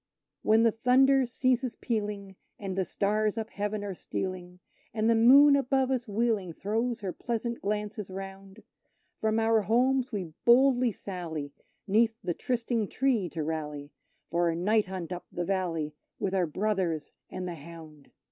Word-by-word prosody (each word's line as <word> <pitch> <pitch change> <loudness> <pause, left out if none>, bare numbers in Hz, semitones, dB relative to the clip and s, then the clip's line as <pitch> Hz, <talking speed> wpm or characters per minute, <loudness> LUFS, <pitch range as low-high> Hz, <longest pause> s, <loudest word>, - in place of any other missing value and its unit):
When 220 +1 +4
the 230 - +5
thunder 260 +3 +4
ceases 255 0 0
pealing, 205 -4 -3 0.2
and 195 -2 -5
the 190 -1 0
stars 210 +4 0
up 225 0 -4
heaven 205 +1 -3
are 200 -1 -4
stealing, 180 0 -5 0.4
And 220 0 +1
the 230 - +5
Moon 275 +6 +7
above 265 -1 +1
us 250 -2 -1
wheeling 210 -4 0
throws 225 +6 -2
her 190 -3 -3
pleasant 235 0 -3
glances 210 0 -3
round, 195 +2 -9 0.6
From 220 0 +1
our 225 0 +3
homes 255 +4 +2
we 185 -7 -4
boldly 250 0 +5
sally 165 -8 -6 0.3
'neath 220 +3 +3
the 175 - -1
trysting 235 0 -1
tree 240 -9 0
to 160 -2 -4
rally, 150 -2 -4 0.4
For 170 0 +2
a 165 - -1
night 210 +4 +2
hunt 185 -2 -6
up 180 - -8
the 175 - -3
valley, 165 -5 -1 0.2
with 195 -2 -2
our 185 -3 +2
brothers 180 -4 -1 0.2
and 185 - -5
the 175 - -4
hound! 155 -2 -12
205 Hz, 155 wpm, -29 LUFS, 180-235 Hz, 0.6 s, Moon